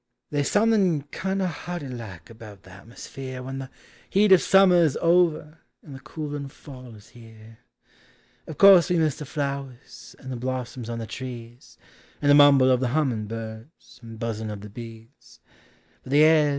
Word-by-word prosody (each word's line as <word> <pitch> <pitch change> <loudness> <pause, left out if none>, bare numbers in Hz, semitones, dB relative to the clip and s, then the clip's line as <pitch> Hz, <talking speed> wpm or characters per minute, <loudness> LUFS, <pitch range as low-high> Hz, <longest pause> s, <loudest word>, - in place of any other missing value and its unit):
They's 145 -1 -1
something 205 -8 +2
kindo' 190 0 -2
harty 175 -2 -6
like 110 -8 -9
about 105 -3 -13
the 95 - -16
at 95 +4 -15
musfere 130 +2 -9
When 135 +1 -6
the 135 -1 -8 0.4
heat 205 +1 +3
of 190 - +7
summer 185 -3 +5
's 135 - -6
over 165 -2 +1 0.2
and 145 - -12
the 135 - -9
coolin' 145 0 -6
fall 130 -4 -13
is 105 0 -17
here 110 -1 -16 0.4
— - - -34
Of 160 - -8
course 195 -3 +7
we 180 - +1
miss 155 -4 0
the 150 - -8
flowers, 140 -3 -6
and 130 -2 -10
the 125 - -4
blossums 125 -1 -5
on 115 - -4
the 115 - -5
trees, 120 0 -10 0.4
And 145 -1 +2
the - - +7
mumble 140 -3 +6
of 125 - +3
the 130 - -1
hummingbirds 115 -1 -5
and 115 -1 -11
buzzin' 110 -1 -4
of 105 -1 -7
the 105 - -10
bees; 115 - -13 0.6
But 130 - -7
the 150 +1 +6
air 155 -1 +5
130 Hz, 175 wpm, -24 LUFS, 115-155 Hz, 0.6 s, of